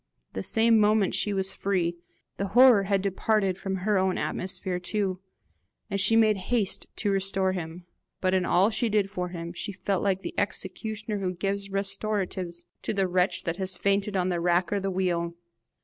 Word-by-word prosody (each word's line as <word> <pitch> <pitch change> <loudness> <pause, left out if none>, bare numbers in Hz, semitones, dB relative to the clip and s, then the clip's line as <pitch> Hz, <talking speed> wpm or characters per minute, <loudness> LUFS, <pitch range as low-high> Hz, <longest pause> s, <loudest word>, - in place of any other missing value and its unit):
The 95 - -3
same 225 - +4
moment 210 -2 +3
she 210 - +1
was 195 -1 0
free; 175 -3 -1 0.4
the 195 - -2
horror 245 -6 +7
had 195 -1 +1
departed 195 0 +1
from 190 0 -3
her 195 +1 +1
own 185 0 +1
atmosphere 185 -1 -2
too, 190 0 -2 0.7
and 200 0 0
she 225 - +4
made 215 -2 +4
haste 230 -6 0
to 205 - -1
restore 195 -1 +2
him. 175 -1 -6 0.3
But 185 -1 +1
in 185 -1 +2
all 185 +5 +3
she 230 +1 +1
did 205 -2 +1
for 180 -3 -3
him, 170 -1 -6
she 195 - -3
felt 195 0 -2
like 190 -2 0
the - - -5
executioner 210 +2 -3
who 185 -2 -2
gives 200 +2 -2
restoratives 195 -3 -2 0.2
to - - -2
the 195 -1 +2
wretch 180 +1 +1
that 165 0 -2
has 190 -1 -1
fainted 200 0 +1
on 185 0 +1
the 175 -2 -1
rack 175 +2 +1
or 200 - +1
the 195 0 -2
wheel. 175 -2 -1
195 Hz, 185 wpm, -27 LUFS, 180-205 Hz, 0.7 s, horror